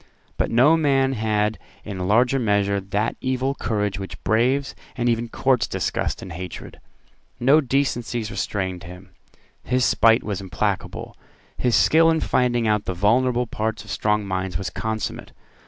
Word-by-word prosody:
But - - -1
no 130 +7 +5
man 135 -4 +2
had 105 -2 0 0.3
in 95 -3 -4
larger 125 +6 +3
measure 100 -3 +1
that 100 +3 -2
evil 130 +1 0
courage 105 -6 -2
which 95 - -8
braves 130 +5 +1 0.2
and 120 -2 -1
even 115 0 0
courts 130 0 +1
disgust - - -2
and 95 - -8
hatred. 90 0 -8 0.6
No 140 +6 +5
decencies 120 -4 -1
restrained 95 -5 -3
him: 90 +2 -12 0.5
his 125 0 +1
spite 115 0 +4
was 100 -2 -3
implacable: 90 -4 -3 0.4
his 125 -2 +1
skill 165 +1 +5
in 160 0 +2
finding 120 -5 +1
out 105 -1 +1
the 95 - -3
vulnerable 120 +6 +2
parts 110 -2 -3
of 105 - -10
strong 105 -1 0
minds 95 -2 -2
was 90 -1 -4
consummate. 110 +3 -4
110 Hz, 150 wpm, -23 LUFS, 100-125 Hz, 0.6 s, no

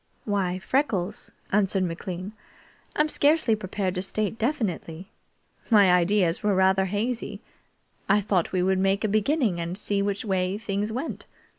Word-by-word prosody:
"Why, 195 -4 0
Freckles," 205 -4 -1 0.2
answered 195 -1 +2
McLean, 180 +3 -5 0.6
"I'm 300 - +3
scarcely 295 -6 +3
prepared 195 -2 -3
to 180 - -2
state 210 +3 -2
definitely. 205 - -3 0.6
My 205 -5 +6
ideas 180 0 +2
were 210 -2 +1
rather 190 0 +3
hazy. 210 +1 -3 0.7
I 200 +2 +5
thought 190 -4 0
we 185 -1 +1
would 190 0 +2
make 195 +2 +1
a - - +2
beginning 215 - +1
and 170 +2 -3
see 200 -1 0
which 200 +3 -2
way 190 -1 0
things 205 0 -2
went. 260 +8 -5
200 Hz, 145 wpm, -26 LUFS, 185-215 Hz, 0.7 s, My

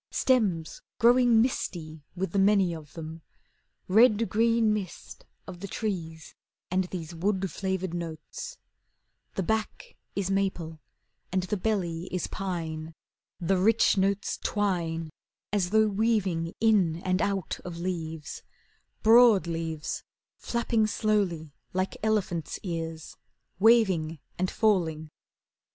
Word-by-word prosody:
Stems 200 -11 +1 0.2
growing 240 -1 +5
misty 160 - -3
With 185 -1 -2
the 200 - +1
many 195 -3 +4
of 155 -3 -10
them, 160 0 -7 0.7
Red 220 +2 +5
green 230 0 +3
mist 200 -5 -6 0.2
Of 180 -2 -9
the 200 - -6
trees, 170 -6 -4 0.4
And 185 0 +2
these 175 -2 -6
Wood 190 +2 -1
flavoured 190 -2 -2
notes. 175 - -6 0.8
The 190 - 0
back 220 - -2 0.2
is 195 -1 -1
maple 180 -5 -1 0.5
and 185 0 +1
the 185 +3 -1
belly 180 -5 -1
is 180 -2 -1
pine. 165 -4 -4 0.4
The 185 +2 +1
rich 225 +4 +4
notes 195 +1 0
twine 170 -6 -1 0.4
As 190 -4 +1
though 220 +2 +4
weaving 200 -6 0
in 205 -8 +3
and 185 0 +1
out 195 -3 -1
of 175 -2 -6
leaves, 165 -3 -4 0.6
Broad 225 -3 +7
leaves 165 -2 -3 0.3
Flapping 235 -2 0
slowly 195 -9 0 0.2
like 185 +1 -1
elephants' 200 -7 -1
ears, 165 -3 -5 0.4
Waving 190 -8 +4 0.2
and 185 0 +1
falling. 160 -8 +1
185 Hz, 115 wpm, -28 LUFS, 165-215 Hz, 0.8 s, Broad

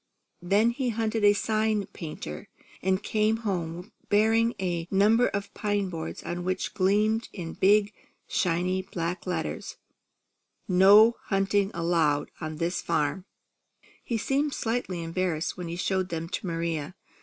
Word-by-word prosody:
Then 205 +6 +3
he 250 +1 -2
hunted 225 -1 -1
a 205 0 +7
sign 215 0 0
painter, 150 - -7 0.3
and 190 +1 0
came 215 +1 +1
home 175 0 -3 0.2
bearing 225 +3 +3
a 175 -3 -2
number 215 +5 +4
of 200 0 -4
pine 205 -3 -1
boards 165 -2 -6
on 175 0 -4
which 185 +1 -2
gleamed 210 +3 +2
in 170 -4 -6
big, 205 +2 +3 0.4
shiny 180 0 +1
black 175 0 -4
letters: 170 -3 -3 0.3
+ - - -52 0.2
+ - - -51
| - - -52
NO 205 +5 +7
HUNTING 195 0 +1
ALLOWED 165 -4 +1
| - - -40
| - - -23
ON 155 -1 -4
THIS 175 +1 -1
FARM 165 +3 -1 0.2
| - - -52
+ - - -34
+ - - -29
He 235 - -2
seemed 275 +6 0
slightly 225 -7 -2
embarrassed 165 -1 -2
when 180 -1 -6
he 165 - -4
showed 185 +1 -1
them 165 0 -4
to 190 - -4
Maria. 165 -1 -3
190 Hz, 165 wpm, -27 LUFS, 170-215 Hz, 0.4 s, a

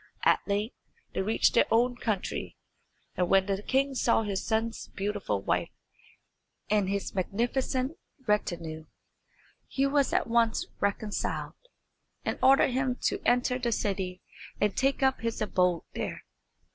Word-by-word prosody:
At - - +5
length 205 +3 -1 0.4
they - - 0
reached 215 +4 +2
their - - +4
own 245 +2 +3
country, 215 -5 -3 0.6
and 180 -1 0
when 195 -1 +5
the 195 0 -1
king 270 +5 +1
saw 235 -3 +2
his 200 -2 -2
son's 225 0 -1
beautiful 200 - -2
wife - - 0 1.0
and 205 -3 +3
his 200 0 -2
magnificent 255 - -1 0.3
retinue 165 -7 -1 0.8
he 275 - 0
was 280 0 +2
at - - +2
once 230 -1 +2
reconciled, 200 +1 -1 0.7
and - - -2
ordered 265 0 +6
him 255 0 0
to - - +1
enter 250 +1 +2
the 240 -2 0
city 190 -4 -2 0.4
and 205 -1 +1
take 270 +1 +1
up 265 -2 +2
his 230 0 -2
abode 180 -5 +1
there. - - -4
220 Hz, 135 wpm, -29 LUFS, 195-250 Hz, 1.0 s, ordered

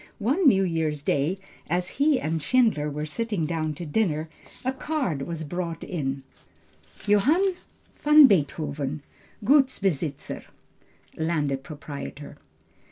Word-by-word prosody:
One 280 - +2
New 195 -7 +5
year's 160 -4 -1
day, 145 +8 +1 0.3
as 180 +1 0
he 290 -2 +4
and 160 +1 -2
Schindler 220 -8 +2
were 150 +1 -4
sitting 205 +1 -2
down 155 -1 -2
to 170 - -6
dinner, 160 -3 0 0.4
a 260 - +1
card 265 - -2
was 160 +2 -4
brought 170 +1 -4
in 135 -5 -3 0.8
JOHANN 285 - +3 0.5
VAN 300 0 +8
BEETHOVEN 150 - 0 0.4
Gutsbesitzer 195 - +1 0.7
(Landed 150 -4 0
proprietor). 145 -1 -8
165 Hz, 110 wpm, -26 LUFS, 150-225 Hz, 0.8 s, VAN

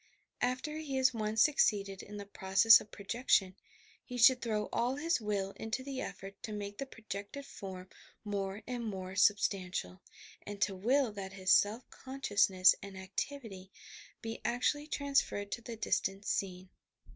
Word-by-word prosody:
After 260 +5 -1
he 290 -4 -4
has 260 -1 +4
once 215 -1 +2
succeeded 200 -9 +2
in 205 +1 -9
the 200 - -6
process 195 +3 +6
of 210 - -13
projection, 200 -2 +1 0.5
he 250 - -7
should 250 +1 +6
throw 215 -2 -1
all 245 +3 +1
his 320 -1 0
will 200 -2 -1
into 225 +4 -3
the 270 -1 -4
effort 195 +1 -8
to 220 - -6
make 205 -1 -6
the 275 - -3
projected 215 +3 -7
form 190 -6 -8 0.4
more 200 0 -3
and 245 -1 -4
more 190 -3 -5
substantial, 185 - +1 0.4
and 205 -1 -8
to 195 - +1
will 245 +6 +2
that 195 -2 -7
his 185 -1 -1
self 220 +5 +4
consciousness 200 -8 +3
and 200 -1 -9
activity 195 0 -6 0.5
be 225 0 -5
actually 270 +5 0
transferred 275 -9 0
to 235 - -3
the 235 0 -7
distant 200 -2 -1
scene. 185 -1 -2
210 Hz, 155 wpm, -33 LUFS, 195-250 Hz, 0.5 s, process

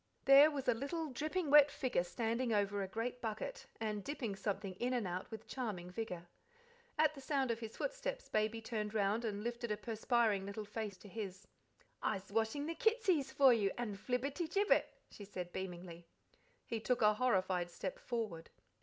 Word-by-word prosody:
There 275 +3 +9
was 285 -3 -4
a 245 - +5
little, 290 +6 -3
dripping 310 +4 -1
wet 295 -1 +9
figure 255 -10 0
standing 230 +6 -1
over 205 -1 +1
a 195 - -2
great 235 +5 -3
bucket, 225 - -4
and 210 -2 -2
dipping 240 -7 -3
something 195 -1 -3
in 250 +1 0
and 240 -4 0
out 180 +1 -4
with 220 -2 -8
charming 200 -9 -4
vigour. 180 -4 -5 0.7
At 310 0 +4
the 275 - -10
sound 270 -2 +1
of 230 - -2
his 225 -1 -7
footsteps, - - -3
Baby 215 +1 0
turned 215 -2 -3
round 210 +2 +2
and 210 -2 -2
lifted 235 0 -3
a 210 - 0
perspiring 225 -2 +1
little 200 +2 -5
face 210 -2 -4
to 205 - -13
his. 195 -2 -6 0.6
"I'se 195 -2 -2
washing 225 +7 0
the 330 - -2
kitsies 380 - +2
for 265 -1 +7
you, 210 -4 +2
and 235 -4 -2
Flibberty 270 - -1
Gibbet," 400 +4 +3 0.2
she 205 - -10
said 180 -3 -6
beamingly. 175 -2 -6 0.6
He 230 - -2
took 245 +1 +1
a 210 0 +6
horrified 190 -7 +1
step 185 +2 -5
forward. 215 -9 -3
225 Hz, 180 wpm, -36 LUFS, 200-265 Hz, 0.7 s, There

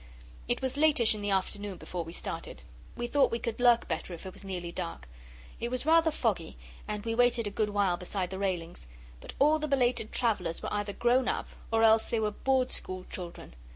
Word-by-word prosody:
It - - 0
was 260 +1 -1
latish 290 -8 +5
in 210 - -5
the 205 - -1
afternoon 195 0 -1
before 175 -1 -5
we 165 - -9
started. - - -5 0.3
We 240 - -2
thought 280 +3 +3
we 230 - -1
could 230 -1 -4
lurk 240 -1 +5
better 180 - -3
if 165 - -13
it 190 - -7
was - - -7
nearly 180 -3 -5
dark. 70 - -5 0.5
It 235 - -2
was 255 +2 -1
rather 325 +1 +5
foggy, 210 - -1 0.3
and 210 0 -4
we 225 - 0
waited 245 -1 +3
a 205 - -3
good 210 +1 0
while 200 -4 +1
beside 180 +1 -3
the 190 - -4
railings, 175 - -3 0.3
but - - -10
all 300 +2 +4
the 305 - -2
belated 250 -5 +1
travellers 205 -9 0
were - - -3
either 205 -1 -2
grown 245 +3 +2
up - - -1 0.2
or 225 0 +3
else 220 0 +5
they 230 - +1
were 215 -1 0
Board 260 +3 +1
School 185 0 -5
children. 175 - -7
215 Hz, 215 wpm, -30 LUFS, 185-245 Hz, 0.5 s, latish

